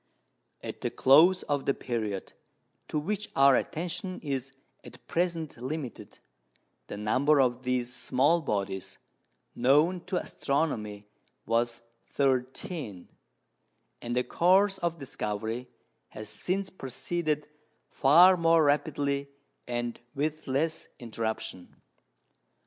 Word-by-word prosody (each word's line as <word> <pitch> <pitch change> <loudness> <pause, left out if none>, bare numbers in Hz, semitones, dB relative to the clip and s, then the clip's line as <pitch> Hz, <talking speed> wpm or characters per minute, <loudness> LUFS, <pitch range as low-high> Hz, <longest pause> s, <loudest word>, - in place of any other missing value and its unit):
At - - -7
the - - -1
close 165 +8 +5
of 145 -2 -2
the 140 - +3
period 110 -6 -4 0.5
to - - -2
which 210 +7 -2
our 135 -1 +6
attention 180 +5 -3
is 135 -2 -3 0.3
at - - -14
present 165 -4 -1
limited, 130 0 -6 0.7
the - - -6
number 130 +8 +3
of 125 -1 +2
these 125 -1 -1
small 145 +9 +2
bodies 100 -6 -3 0.6
known 150 +8 +3
to 180 0 -1
astronomy 105 -9 -2 0.4
was 115 0 0 0.3
thirteen; 130 - -2 0.9
and 120 0 -3
the 125 - +2
course 190 +5 +3
of 170 -2 -1
discovery 115 -3 -4 0.4
has 110 0 -7
since 190 +1 -2
proceeded 150 +2 -2 0.4
far 175 +7 +6
more 165 -1 +4
rapidly 145 -1 0 0.4
and 120 -1 -3 0.2
with 155 +2 -2
less 155 +5 -1
interruption. 110 -5 -5
140 Hz, 105 wpm, -29 LUFS, 120-165 Hz, 0.9 s, our